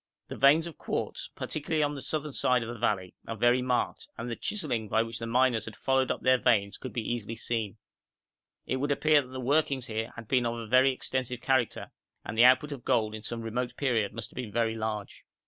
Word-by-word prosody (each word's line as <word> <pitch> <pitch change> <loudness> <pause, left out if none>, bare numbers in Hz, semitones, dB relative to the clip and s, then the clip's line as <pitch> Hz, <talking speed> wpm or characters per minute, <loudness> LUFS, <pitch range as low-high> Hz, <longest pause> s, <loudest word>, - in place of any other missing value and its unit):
The - - -5
veins 145 +4 +5
of 170 -3 -9
quartz, - - -3
particularly 155 0 -1
on 145 0 0
the 140 - -6
southern 150 +2 -2
side 125 -2 +2
of 115 - -6
the 120 -1 -6
valley, 95 -5 0
are 115 - -3
very 120 +3 +3
marked, 125 -1 -1
and 120 +1 -4
the - - -2
chiselling 125 - -2
by 110 +2 +3
which 115 -1 -6
the 115 - -4
miners 120 -2 +2
had 110 - -8
followed 135 -1 +1
up - - -2
their 130 0 +5
veins 100 -6 +2
could 130 - -8
easily 115 -1 -2
be - - -6
seen; 110 -2 -2 0.9
it 130 - -1
would 145 +3 -1
appear 150 +1 +4
that 130 - -11
the 130 +1 -7
workings 135 0 +1
here 110 0 -3
had 115 -2 -9
been 125 -1 +2
of 115 - -2
a 115 - -5
very 130 +4 +5
extensive 130 -1 -3
character, 130 -1 0 0.3
and 105 - -5
the 115 +2 +7
output 130 +4 +5
of 135 -4 -6
gold 110 -1 +1
in 110 - -6
some 115 +1 -5
remote 120 +2 -3
period 115 -7 +1
must 115 -1 -6
have - - -19
been 120 -4 -5
very 115 +1 +1
large. 110 -2 -4
120 Hz, 230 wpm, -29 LUFS, 115-130 Hz, 0.9 s, the